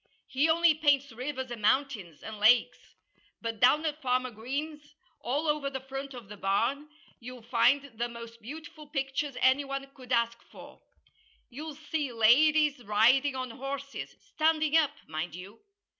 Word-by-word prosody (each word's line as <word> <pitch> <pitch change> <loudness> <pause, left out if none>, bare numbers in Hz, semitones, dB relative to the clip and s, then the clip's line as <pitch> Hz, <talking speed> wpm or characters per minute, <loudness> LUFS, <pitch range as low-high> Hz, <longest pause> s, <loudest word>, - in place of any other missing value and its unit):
He 280 +5 +1
only 335 0 +5
paints 285 -3 +2
rivers 260 +2 -5
and 235 -2 -6
mountains, 210 - 0
and 220 -1 -7
lakes. 225 +3 +3 0.4
But 230 -2 -4
down 300 +7 +4
at 305 0 -3
Farmer 255 0 0
Green's, 295 +6 -6 0.2
all 290 +6 -2
over 300 -2 0
the 265 -1 -5
front 270 +1 -7
of 240 -5 -10
the 210 +1 -10
barn, 230 +10 0 0.3
you'll 250 0 -10
find 245 +4 +3 0.2
the 240 0 -1
most 230 0 -10
beautiful 305 +5 -10
pictures 275 -1 -3
anyone 275 +1 +2
could 255 -1 -13
ask 235 -1 +1
for. - - -15 0.7
You'll 300 +4 -7
see 300 -2 -3
ladies 280 +5 +4
riding 240 +7 +3
on 255 -2 -4
horses 275 +2 -6
standing 310 -1 +1
up, 315 -3 +5 0.2
mind 160 +1 -4
you! 190 +5 -11
265 Hz, 150 wpm, -29 LUFS, 235-295 Hz, 0.7 s, only